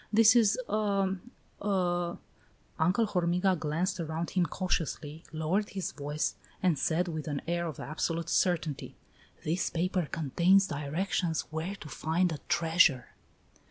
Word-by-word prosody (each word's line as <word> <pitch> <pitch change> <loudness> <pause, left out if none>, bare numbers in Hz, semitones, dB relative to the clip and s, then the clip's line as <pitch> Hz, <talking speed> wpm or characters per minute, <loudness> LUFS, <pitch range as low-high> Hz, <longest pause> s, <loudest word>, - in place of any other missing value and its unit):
This 225 +1 +7
is 225 -3 +5
a 200 -2 +1 0.5
a 175 -3 0 0.3
" 110 -1 -33
Uncle 185 +8 +3
Hormiga 180 -1 +2
glanced 160 +4 -1
around 165 +1 -3
him 180 -3 +2
cautiously, 160 -3 -2
lowered 160 +7 0
his 190 -2 -3
voice, 145 +1 -2 0.3
and 170 -6 +3
said 175 +3 +1
with 155 -2 -4 0.2
air 170 0 0
of 155 - -6
absolute 165 +2 -2
certainty: 165 -5 0 0.5
"This 170 +4 0
paper 180 0 0
contains 175 +6 +3
directions 160 +2 -1
where 160 +5 -3
to 165 - -10
find 165 +4 0
a 155 - -4
treasure!" 160 -6 +3
170 Hz, 130 wpm, -30 LUFS, 160-190 Hz, 0.5 s, This